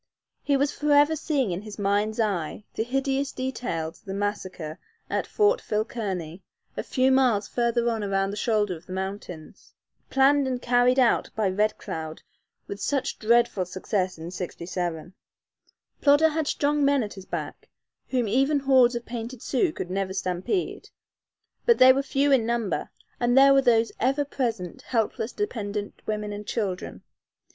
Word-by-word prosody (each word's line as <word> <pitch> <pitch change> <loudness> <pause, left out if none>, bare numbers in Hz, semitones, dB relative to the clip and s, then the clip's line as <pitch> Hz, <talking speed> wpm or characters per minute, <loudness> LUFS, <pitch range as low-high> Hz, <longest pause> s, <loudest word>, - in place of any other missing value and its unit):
He 280 -1 +2
was 285 +1 +1
forever 295 +1 +3
seeing 280 - 0
in 175 +4 -4
mind's 205 +2 0
eye 200 -4 -1
the - - -2
hideous 270 +2 -1
details 230 -11 -4
of - - -32
the 195 -1 -5
massacre 185 -6 -4 0.3
at - - -1
Fort 430 +4 +2
Phil 215 0 -1
Kearny, 185 -7 -5 0.3
a - - -2
few 260 0 +1
miles 245 -6 +3
further 235 0 0
on 225 -2 0
around 195 -1 0
the - - -5
shoulder 210 -3 0
of 165 +1 -14
the 185 - -6
mountains, 190 -4 -7 0.3
planned 275 +1 +4
and 255 -1 -2
carried 245 +1 +3
out 250 -3 +3
by 215 -2 +1
Red 210 +3 +1
Cloud 160 -1 -6 0.4
with 200 0 -7
such 275 -3 -1
dreadful 235 -3 +3
success 185 +1 -2
in 165 +2 -7
'67. 175 -1 -4 0.9
Plodder 290 +2 +5
had 310 -1 -2
strong 295 0 +1
men 280 -2 +3
at 210 - -6
his 190 -1 -11
back, - - -6 0.4
whom 250 -4 0
even 270 +6 +2
hordes 260 -3 +4
of 235 0 -4
painted 235 +1 -6
Sioux 305 +6 +1
could 180 - -6
never 190 0 -2
stampede, 185 - -2 0.8
but 470 - +6
they 260 0 +8
were 275 - +1
few 280 +1 +1
in 260 -4 +5
number, 230 -3 -1 0.3
and 245 +1 +2
there 275 0 +8
were 275 - +5
those 230 -3 +3
ever 275 +4 +1
present 230 - -3
helpless, 225 0 -1
dependent 210 - -4
women 210 -1 -2
and 205 0 -7
children. 195 -6 -3
230 Hz, 160 wpm, -26 LUFS, 195-270 Hz, 0.9 s, they